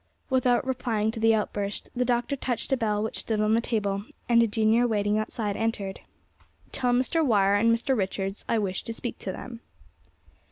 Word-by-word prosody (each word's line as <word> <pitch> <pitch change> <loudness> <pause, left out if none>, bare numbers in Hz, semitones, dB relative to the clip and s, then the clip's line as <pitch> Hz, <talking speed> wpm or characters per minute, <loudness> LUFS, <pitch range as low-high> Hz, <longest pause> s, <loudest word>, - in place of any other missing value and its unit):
Without 255 -1 +2
replying 235 -4 0
to 225 - -6
the 225 0 +4
outburst, 205 -1 -3
the 250 - +1
Doctor 245 +2 0
touched 255 -2 -3
a - - +5
bell 215 -4 0
which 220 - -3
stood 220 -2 -2
on 215 +1 +2
the 230 - +3
table, 205 -4 -1 0.2
and 235 -1 +5
a 230 - +4
junior 220 +3 +3
waiting 210 -1 +1
outside 215 -1 -3
entered. 210 -4 -2 0.7
"Tell 250 -2 0
Mr. 260 +7 +2
Wire 200 -7 +3
and 220 +3 +4
Mr. 235 +4 +1
Richards 195 -1 -2
I 230 - +2
wish 195 -3 -1
to 230 - -3
speak 240 +1 -6
to 190 - -4
them." 235 +4 -8
225 Hz, 190 wpm, -27 LUFS, 205-245 Hz, 0.7 s, a